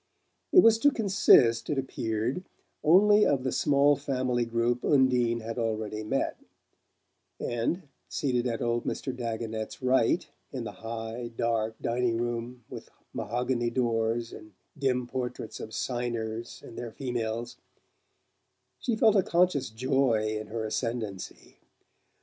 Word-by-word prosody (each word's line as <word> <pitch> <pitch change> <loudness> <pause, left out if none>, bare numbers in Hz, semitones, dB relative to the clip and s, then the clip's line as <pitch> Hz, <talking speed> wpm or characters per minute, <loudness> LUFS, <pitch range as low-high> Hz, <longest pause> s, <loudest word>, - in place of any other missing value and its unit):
It 365 - +8
was 225 0 +6
to 290 - +6
consist, 190 - +4
it 150 - 0
appeared, 120 +3 -2 0.4
only 205 +6 +6
of 135 -7 +2
the 130 - -1
small 145 0 +4
family 130 -3 -1
group 115 +1 0
Undine 125 -4 +3
had 115 +2 -5
already 110 -2 -2
met; 135 +6 -1 1.0
and, 120 +10 -1 0.3
seated 125 -3 0
at 115 -2 -2
old 120 0 0
Mr. 130 -2 -3
Dagonet's 115 -2 -4
right, 130 -2 +2 0.2
in - - -4
the - - -5
high 115 +1 -5
dark 115 -1 0
dining 120 -1 0
room 120 +1 -3
with - - -9 0.2
mahogany 120 0 -1
doors 115 -1 0
and 110 -1 -12 0.2
dim 130 -3 0
portraits 125 -2 -5
of 110 - -7
"Signers" 115 -1 -3
and - - -9
their 120 - -5
females, 120 -1 -4 1.2
she 240 - -1
felt 220 -1 +4
a 195 - +6
conscious 175 -6 +2
joy 120 -2 +1
in 110 - -7
her 110 +1 -4
ascendancy. 110 -3 -4
120 Hz, 130 wpm, -28 LUFS, 115-130 Hz, 1.2 s, It